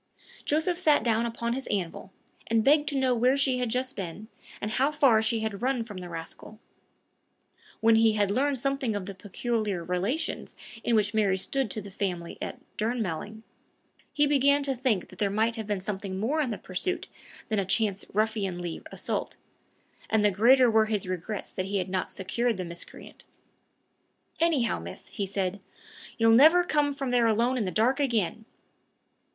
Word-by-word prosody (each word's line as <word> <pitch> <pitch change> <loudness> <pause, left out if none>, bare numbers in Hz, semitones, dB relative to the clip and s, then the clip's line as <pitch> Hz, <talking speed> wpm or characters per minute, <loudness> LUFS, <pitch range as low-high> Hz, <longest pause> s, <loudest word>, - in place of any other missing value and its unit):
Joseph 320 +4 +1
sat 310 -5 +4
down 230 0 +1
upon 235 0 -2
his 265 +2 -5
anvil, 190 -1 -3 0.4
and 225 -1 +2
begged 295 +3 +4
to 285 - -2
know 260 -1 +2
where 250 +3 +3
she 265 -2 +2
had 250 -2 -1
just 255 +3 -2
been, 195 +3 -6 0.3
and 210 - -3
how 270 +6 +2
far 275 -7 +4
she 220 0 0
had 220 -2 -3
run 255 -1 0
from 210 -4 -9
the 180 -1 -7
rascal. 165 +5 -8 1.2
When 225 +1 +5
he 225 -1 +5
had 205 -2 +1
learned 275 +5 +1
something 275 -3 -1
of 200 -2 -3
the 200 - -6
peculiar 205 -1 -2
relations 195 - -2 0.3
in 235 - +2
which 210 -1 +2
Mary 205 -3 +2
stood 265 +5 -1
to 215 - -4
the 200 - -10
family 180 -4 -4
at - - -4 0.2
Durnmelling, 220 -2 -3 0.7
he 295 - +3
began 280 0 +3
to 275 -1 0
think 240 -7 0
there 200 +2 -2
might 220 +3 +1
have 220 -3 -5
been 205 -2 -1
something 190 0 -4
more 280 +9 +1
in 275 - -1
the 215 - -3
pursuit 270 - -3 0.4
than 215 -2 +1
a - - +1
chance 200 +1 0
ruffianly 195 -5 -1
assault, - - -4 0.7
and 220 -1 +3
the 205 - +5
greater 240 +5 +5
were 220 0 +4
his 210 -4 -2
regrets 185 +3 -5
that 185 - -2
he 200 +1 -1
had 185 -1 -2
not 185 0 -2
secured 225 +4 -1
the 185 - -4
miscreant. 170 0 -9 1.2
"Anyhow, 305 -8 +2
miss," - - -9
he 200 -2 -3
said, 195 0 -2 0.6
"you'll 225 -1 +5
never 315 +9 +7
come 295 -4 +1
from 275 -2 -3
there 240 -2 +4
alone 235 +4 +2
in 235 -5 0
the - - -1
dark 230 - +2
again!" 225 -5 0
220 Hz, 180 wpm, -28 LUFS, 200-260 Hz, 1.2 s, never